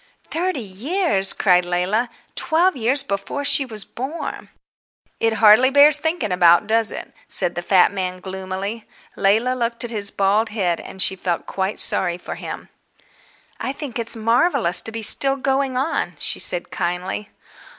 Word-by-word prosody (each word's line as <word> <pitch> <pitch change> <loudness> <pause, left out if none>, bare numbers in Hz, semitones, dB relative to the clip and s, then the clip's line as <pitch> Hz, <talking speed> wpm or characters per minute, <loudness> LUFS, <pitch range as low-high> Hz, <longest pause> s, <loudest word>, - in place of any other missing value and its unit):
"Thirty 345 -4 -2
years?" 215 - +1
cried 180 -3 +2
Leila. 180 +7 -1 0.2
Twelve 345 +2 +1
years 260 +3 +2
before 200 +5 -4
she 280 - +5
was 215 -4 -5
born! 275 +7 -7 0.7
"It 225 0 +1
hardly 220 +4 +5
bears 285 +2 +5
thinking 315 - -2
about, 175 +1 +4
does 225 0 +1
it?" - - -7
said 175 - +2
the 175 - -4
fat 185 +2 +3
man 185 -2 -4
gloomily. 190 +3 -6 0.3
Leila 220 +6 +1
looked 235 -1 -2
at 240 - -5
his 205 -3 -1
bald 205 +4 0
head, 185 -6 -1
and 190 - -4
she 190 - 0
felt 180 -2 -3
quite 190 +1 -3
sorry 175 -2 -1
for 180 - -8
him. - - -8 0.9
"I 265 - -3
think 275 -5 -6
it's 230 +1 0
marvellous 230 - +2
to 225 - -2
be 225 0 -5
still 270 +5 +5
going 270 -1 -1
on," 275 +6 -2
she - - -3
said 175 -1 +1
kindly. 180 +4 -4
220 Hz, 160 wpm, -20 LUFS, 190-265 Hz, 0.9 s, she